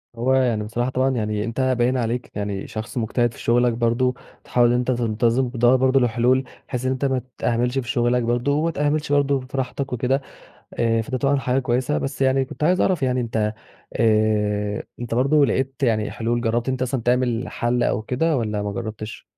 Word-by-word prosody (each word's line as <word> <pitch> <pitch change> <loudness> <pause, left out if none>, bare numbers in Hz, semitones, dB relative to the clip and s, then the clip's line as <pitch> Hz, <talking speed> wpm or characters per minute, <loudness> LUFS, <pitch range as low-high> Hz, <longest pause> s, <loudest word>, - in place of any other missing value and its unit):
هو، 120 +3 +1
يعني 125 -5 +2
بصراحة 120 +4 -2
طبعًا 130 +1 +1
يعني 105 -4 -1
أنت 115 +3 -3
باين 130 0 +2
عليك 120 0 -2
يعني 100 -1 -3
شخص 110 +3 -6
مجتهد 120 +1 0
في - - -14
شغلك 120 +1 +2
برضه، 120 +2 +1 0.3
تحاول 120 -1 +3
أنت 125 +1 +1
تنتظم، 120 +1 +1
بتدّور 120 +1 +3
برضه 130 +1 +3
لحلول 125 +2 +2 0.2
بحيث 125 0 -4
إن 130 - +1
أنت 130 +1 -1
ما 130 -2 0 0.2
تِهملش 125 +2 0
في 120 -2 -6
شغلك 120 -1 +1
برضه، 120 +4 0
وما 155 +3 +1
تِهملش 150 -1 -1
برضه 140 -1 +2
فى 130 +2 -8
راحتك 135 0 -3
وكده. 130 +3 0 0.5
آآ 115 -1 +1
فده 130 +3 -3
طبعًا 140 +2 +2
حاجة 130 0 0
كويسة، 130 +3 0
بس 135 - -4
يعني 135 0 +3
كنت 135 - -7
عايز 180 +4 +3
أعرف 180 -7 +1
يعني 125 -1 +1
أنت 110 -2 -1 0.4
آآ 105 -2 +1 0.2
أنت 120 -1 -3
برضه 140 +4 +4
لقيت 135 0 -1
يعني 110 -4 +1
حلول، 120 +1 -1
جربت 120 +2 0
أنت 130 -1 -2
أصلًا 130 0 -1
تعمل 125 0 0
حَل 120 +1 0
أو 110 - 0
كده 135 +7 0
والّا 105 -3 -2
ما 100 0 -3
جربتِش؟ 110 0 -6
125 Hz, 190 wpm, -22 LUFS, 115-130 Hz, 0.5 s, برضه